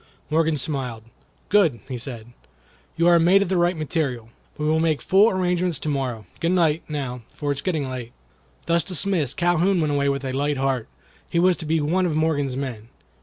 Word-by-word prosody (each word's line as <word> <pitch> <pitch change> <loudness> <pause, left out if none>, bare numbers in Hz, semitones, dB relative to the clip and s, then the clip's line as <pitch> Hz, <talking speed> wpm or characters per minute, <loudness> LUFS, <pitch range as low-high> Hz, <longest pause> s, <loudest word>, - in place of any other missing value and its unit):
Morgan 160 0 +2
smiled. 130 -6 -4 0.5
"Good!" 175 - +3
he 130 - -5
said. 120 -1 -7 0.6
"You 170 - +2
are 170 -1 +6
made 185 +4 +5
of 175 - -5
the 190 - +1
right 175 0 +2
material. 140 -7 -2 0.3
We 150 - -2
will 155 +1 +2
make 160 -3 +1
full 200 +4 +4
arrangements 180 -4 0
to 155 - -4
morrow. 130 -7 -2
Good 170 +2 +1
night, 165 -3 +2
now, 135 -5 -4
for 145 -1 -2
it 140 - -2
is - - -4
getting 160 -7 -1
late." 125 -2 -6 0.5
Thus 170 -1 +2
dismissed 170 -5 0
Calhoun 175 +2 +2
went 155 -2 +1
away 140 0 +1
with 140 0 -2
a 130 - -3
light 145 +1 0
heart. 135 -3 -1 0.4
He - - -2
was 180 +1 +4
to 160 - -6
be 160 +1 +2
one 180 +5 +1
of 160 - -2
Morgan's 145 -4 0
men. 120 -5 -5
155 Hz, 200 wpm, -23 LUFS, 135-175 Hz, 0.6 s, are